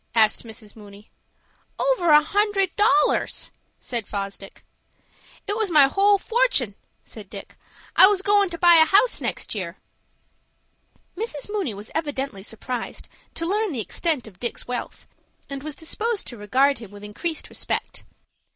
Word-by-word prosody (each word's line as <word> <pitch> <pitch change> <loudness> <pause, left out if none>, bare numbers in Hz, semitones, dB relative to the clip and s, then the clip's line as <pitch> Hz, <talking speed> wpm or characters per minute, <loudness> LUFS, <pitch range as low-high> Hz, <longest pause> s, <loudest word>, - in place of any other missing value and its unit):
asked 220 -2 +3
Mrs. 220 -2 -11
Mooney. 205 -1 -14 0.7
"Over - - +1
a 300 0 +7
hundred 395 +1 +1
dollars," 400 -1 +2 0.3
said 235 -4 -4
Fosdick. 195 -1 -6 0.8
"It 410 - -1
was 435 -2 0
my 305 -4 +7
whole 400 +6 +4
fortun'," 450 - +1 0.3
said 210 -4 -11
Dick. 200 -2 -10 0.4
"I 375 - +9
was 395 -1 +1
goin' 405 -1 +4
to 340 - -6
buy 345 0 +7
a 320 - +7
house 405 +8 +3
next - - -2
year." 185 -4 -5 1.4
Mrs. 415 -4 -4
Mooney 385 - -2
was 205 +2 -8
evidently 275 -9 -3
surprised 230 +4 -6 0.3
to 330 - -3
learn 410 +1 0
the 250 - -3
extent 275 - -1
of 195 -5 -15
Dick's 240 - -4
wealth, 245 0 -5 0.5
and 275 -1 -5
was 300 0 -6
disposed 430 +6 -2
to 240 - -6
regard 260 +6 +2
him 225 -4 -10
with 205 0 -13
increased 315 +11 -4
respect. - - -4
295 Hz, 150 wpm, -23 LUFS, -, 1.4 s, I